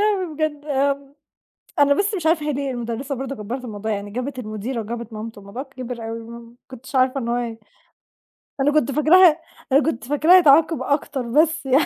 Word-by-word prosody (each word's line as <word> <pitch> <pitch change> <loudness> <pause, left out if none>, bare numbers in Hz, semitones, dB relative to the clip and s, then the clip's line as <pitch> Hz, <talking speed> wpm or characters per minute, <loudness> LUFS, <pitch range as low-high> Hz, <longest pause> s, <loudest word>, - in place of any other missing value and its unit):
إيه 385 -6 0
بجد؟ 295 -1 -2
امم، 280 -1 -1 0.7
أنا 285 0 +5
بس 405 +7 0
مش 350 -5 -4
عارفة 320 -2 +2
هي 300 - 0
ليه 275 0 -2
المُدرِّسة 240 +3 -4
برضه 270 +1 -5
كبّرِت 235 +5 -6
الموضوع 220 -1 -4
يعني، 205 0 -4
جابت 255 +4 -4
المديرة 215 +2 -4
وجابت 230 +1 -6
مامتُه 215 0 -7
والموضوع 200 +7 -7
كِبِر 255 -4 -7
أوي، 230 - -5
آه، - - -11
ما 235 +1 -12
كنتش 260 +1 -11
عارفة 260 +1 +3
إن 235 - -4
هو 240 - +1 1.3
أنا 285 +2 +3
كنت 300 -3 +2
فاكراه 320 +3 +6 0.3
أنا 275 +3 +5
كنت 240 -8 -2
فاكراه 305 +6 +5
هيتعاقب 320 -1 +5
أكتر 285 -1 -1
بس 310 +6 +1
يعني. 270 +3 +3
270 Hz, 185 wpm, -22 LUFS, 235-300 Hz, 1.3 s, فاكراه